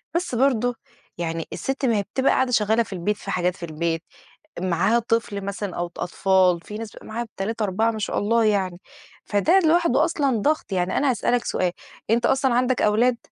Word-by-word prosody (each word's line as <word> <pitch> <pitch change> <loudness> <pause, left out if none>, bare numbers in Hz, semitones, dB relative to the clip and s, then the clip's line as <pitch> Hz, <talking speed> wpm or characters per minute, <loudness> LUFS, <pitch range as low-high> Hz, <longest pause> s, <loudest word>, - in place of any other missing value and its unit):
بس 345 -7 -1
برضه 245 -1 +2 0.4
يعني 165 -1 -3
الست 270 0 -2
ما 230 -4 +2
هي 200 - 0
بتبقى 265 0 +3
قاعدة 260 -1 +1
شغالة 220 0 +3
في 205 - -9
البيت 190 +3 -1
في 195 - -6
حاجات 180 0 0
في 180 - -12
البيت، 165 +1 -2 0.6
معاها 185 +6 +2
طفل 225 -3 -1
مثلًا 200 -1 -4
أو 175 0 -1
ط 170 - -16
أطفال، 185 -1 +2
في 210 +4 -8
ناس 225 -1 -6
بيبقى - - -13
معاها 235 +2 -4
3،4 220 +1 0
ما 220 - -6
شاء 210 - -1
الله 225 +2 +2
يعني، 190 -4 0 0.5
فده 315 - +3
لوحده 325 -4 +3
أصلًا 280 -7 0
ضغط، 300 +2 0
يعني 180 0 0
أنا 280 -1 +2
هاسألك 245 0 0
سؤال، 180 -1 0 0.4
أنت 235 +1 +2
أصلًا 265 -2 +2
عندك 250 0 +1
أولاد؟ 235 +3 +3
220 Hz, 190 wpm, -23 LUFS, 190-245 Hz, 0.6 s, بتبقى